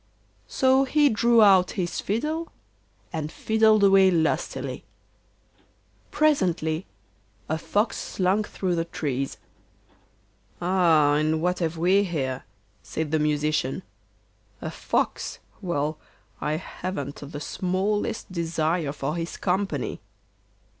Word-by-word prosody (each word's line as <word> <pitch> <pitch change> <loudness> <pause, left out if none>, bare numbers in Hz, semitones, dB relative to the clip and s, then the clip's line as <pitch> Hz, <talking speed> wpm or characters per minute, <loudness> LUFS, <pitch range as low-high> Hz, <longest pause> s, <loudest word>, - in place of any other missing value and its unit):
So 265 +1 +3
he 290 +2 +3
drew 235 0 +4
out 190 -3 +5
his 175 -2 -2
fiddle, 305 +11 -2 0.6
and 155 -1 -3
fiddled 220 0 +3
away 195 -1 +6
lustily. 165 -3 -1 1.3
Presently 180 - +1 0.6
a 160 +1 -1
fox 210 +7 0
slunk 195 +3 0
through 185 -2 -2
the 165 -1 0
trees. 135 -5 -3 1.2
'Aha! 165 -5 +3
what 180 +3 0
have 165 -1 -1
we 185 +4 +4
here?' 135 -8 -3 0.4
said 150 - -4
the 160 - +2
Musician. 150 +1 0 0.8
'A - - -5
fox; - - -2 0.2
well, 155 -4 -2 0.4
I 150 - 0
haven't 155 -3 -5
the 145 0 -7
smallest 195 +6 -2
desire 165 -2 -1
for 150 +1 -3
his 170 0 -4
company. 195 +2 -1
175 Hz, 105 wpm, -25 LUFS, 155-200 Hz, 1.3 s, away